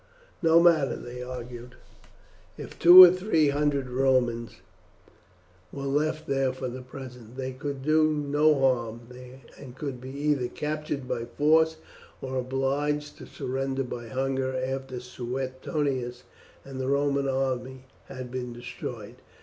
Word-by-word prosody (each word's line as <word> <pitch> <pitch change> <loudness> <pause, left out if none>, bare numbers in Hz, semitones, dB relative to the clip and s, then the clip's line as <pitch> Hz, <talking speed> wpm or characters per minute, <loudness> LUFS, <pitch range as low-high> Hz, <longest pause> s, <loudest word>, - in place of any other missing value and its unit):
What 165 -1 +5
matter, 160 -6 +4
they 125 +1 -8
argued, 125 -1 -8 0.8
if - - -10
two 180 +2 +11
or 180 - +9
three 180 -5 +2
hundred 140 -2 0
Romans 125 -2 +1 1.2
were 140 - -7
left 155 +3 -1
there 135 -1 +1
for 130 0 -5
the 125 +1 -6
present? 125 -2 -11
They 130 -1 -3
could 135 +1 -6
do 155 +1 +3
no 150 0 +2
harm, 120 -4 0 0.6
and 130 -3 -11
could 135 -3 -6
be 130 - -8
either 140 -2 0
captured 150 -2 -4
by 115 - -3
force 160 +4 +2 0.4
or 130 0 -5
obliged 140 +3 -2
to - - -10
surrender 135 +1 -3
by 120 -2 -7
hunger 130 +1 -2
after 130 0 -3
Suetonius 130 +1 -4 0.4
and 135 -1 -8
the 130 - -3
Roman 140 0 +1
army 130 -1 -2 0.2
had 130 -2 -8
been 125 -1 -5
destroyed. 120 -1 -8
135 Hz, 135 wpm, -27 LUFS, 125-145 Hz, 1.2 s, two